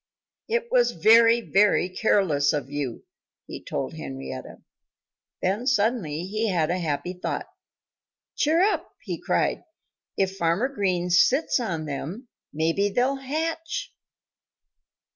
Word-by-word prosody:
"It 470 +1 -1
was - - +3
very, 230 +6 +6
very 205 -4 +3
careless 185 -7 +2
of 140 -2 -3
you," 145 -5 -4 0.4
he - - -9
told - - -4
Henrietta. 65 -1 -8 0.8
Then 205 +7 0
suddenly 210 - +1
he 215 +3 -1
had 170 -4 +1
a 180 - -1
happy 165 +2 -2
thought. 180 - -4 0.9
"Cheer 320 +3 +2
up!" 410 +3 +1
he - - -5
cried. - - 0 0.5
"If 195 0 0
Farmer 170 +9 +1
Green 185 -8 -1
sits 260 - +3
on 170 -10 -3
them, 165 - -6 0.2
maybe 165 +6 +1
they'll 250 +6 +1
hatch." 325 - -3
195 Hz, 120 wpm, -25 LUFS, 165-250 Hz, 0.9 s, very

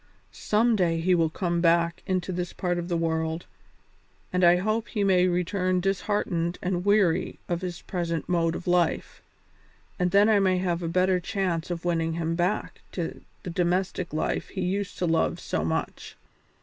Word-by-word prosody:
"Some 225 +2 +2
day 170 -4 +1
he 180 +3 +2
will 165 -2 +3
come 170 +1 -1
back 170 0 +2
into 185 -1 -1
this 180 -1 -3
part 175 -1 -1
of 170 - -4
the 175 -1 0
world, 160 0 -1 0.9
and 180 0 +1
I 175 0 +7
hope 215 +5 -1
he 210 -3 -1
may 185 -2 +4
return 180 +1 0
disheartened 185 -2 -1
and 180 -1 -2
weary 190 -4 +2
of 175 0 -2
his 180 -1 -5
present 170 -4 -3
mode 165 -2 +1
of - - -6
life, 175 -2 0 0.8
and 180 0 +2
then 200 +3 +5
I 215 -2 +4
may 190 -2 +3
have 180 -2 -1
a 170 - -2
better 185 +2 +2
chance 180 -4 -2
of 175 -1 -4
winning 165 -2 0
him 165 0 -1
back 180 +5 -1
to 170 -3 -4 0.2
the 180 - -5
domestic 180 +1 -1
life 155 - -2
he 190 - -5
used 195 +2 -2
to 180 - 0
love 165 +1 +1
so 80 - -2
much. 80 0 -3
180 Hz, 175 wpm, -26 LUFS, 170-185 Hz, 0.9 s, I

